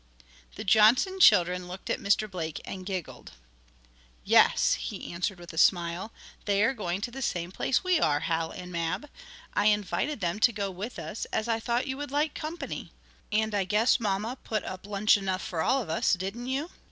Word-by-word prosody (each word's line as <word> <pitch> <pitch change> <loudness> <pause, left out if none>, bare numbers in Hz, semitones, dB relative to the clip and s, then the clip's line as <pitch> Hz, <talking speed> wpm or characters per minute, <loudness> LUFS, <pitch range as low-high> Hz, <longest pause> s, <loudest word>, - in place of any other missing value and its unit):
The - - -6
Johnson 225 - +4
children 180 - +5
looked 180 +2 -9
at - - -1
Mr. 200 +2 +2
Blake 160 -6 -5
and 185 -1 -7
giggled. 185 -4 -6 0.9
"Yes," - - +5
he - - -5
answered 180 +2 -2
with 175 -1 -10
a 160 - -2
smile, 175 +3 +2 0.3
"they 200 0 +2
are 260 - +3
going 190 -5 -3
to 240 - -3
the 270 +2 -7
same 175 -7 -2
place 255 - 0
we 365 -3 +3
are, 145 - +2
Hal 160 0 -1
and 180 0 -9
Mab. 170 - -2 0.5
I 205 - +2
invited 210 +7 0
them 175 +1 -1
to 240 - +5
go 200 -3 -3
with 200 +7 -6
us, 165 +5 -5
as 220 - -2
I 230 -1 +1
thought 235 +2 -1
you 265 -1 -4
would 290 0 -5
like 295 +2 0
company. 315 +3 -6 0.4
And 220 0 +1
I 200 -1 +1
guess 210 +7 +3
mamma 215 +3 -2
put 215 -3 -2
up 185 +1 -7
lunch 205 +1 +3
enough 190 -1 -2
for 165 -3 -3
all 255 +9 +2
of - - -12
us; - - +2
didn't 195 +7 -3
you?" 275 +6 -2
205 Hz, 195 wpm, -28 LUFS, 180-235 Hz, 0.9 s, children